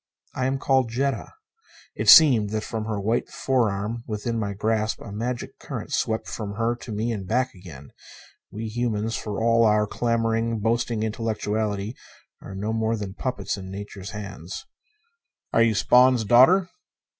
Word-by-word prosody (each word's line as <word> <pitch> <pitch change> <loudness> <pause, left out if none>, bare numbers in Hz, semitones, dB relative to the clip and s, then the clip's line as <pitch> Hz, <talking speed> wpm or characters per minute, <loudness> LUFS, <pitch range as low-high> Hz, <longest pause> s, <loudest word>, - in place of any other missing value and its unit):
"I 130 - -1
am 135 +1 0
called 130 -2 +2
Jetta." 135 +4 -2 0.6
It - - 0
seemed 125 - +8
that 110 +1 -2
from 110 0 -4
her 110 -2 -2
white 110 +4 -1
forearm 115 -3 -1
within 115 +2 -3
my 100 -2 -2
grasp 110 +1 0
a 105 - -9
magic 120 +4 -4
current - - -6
swept 110 0 -1
from 100 -2 -5
her 115 +2 0
to 120 - -9
me 110 +3 -1
and 100 -5 -5
back 125 +4 0
again. 80 -7 -12 0.6
We 110 +3 -6
humans, 115 -1 -2
for 105 -2 -4
all 115 0 +3
our 105 -1 +4
clamoring, 115 0 0
boasting 115 0 0
intellectuality, 110 -1 -2 0.5
are 95 - -9
no 105 +3 -2
more 110 0 0
than 100 -2 -5
puppets 125 +1 -3
in 95 -1 -8
Nature's 100 0 -7
hands. 100 - -7 0.9
"Are - - +4
you 115 -1 +3
Spawn's 125 +2 +5
daughter?" 135 - +6
110 Hz, 155 wpm, -24 LUFS, 105-120 Hz, 0.9 s, seemed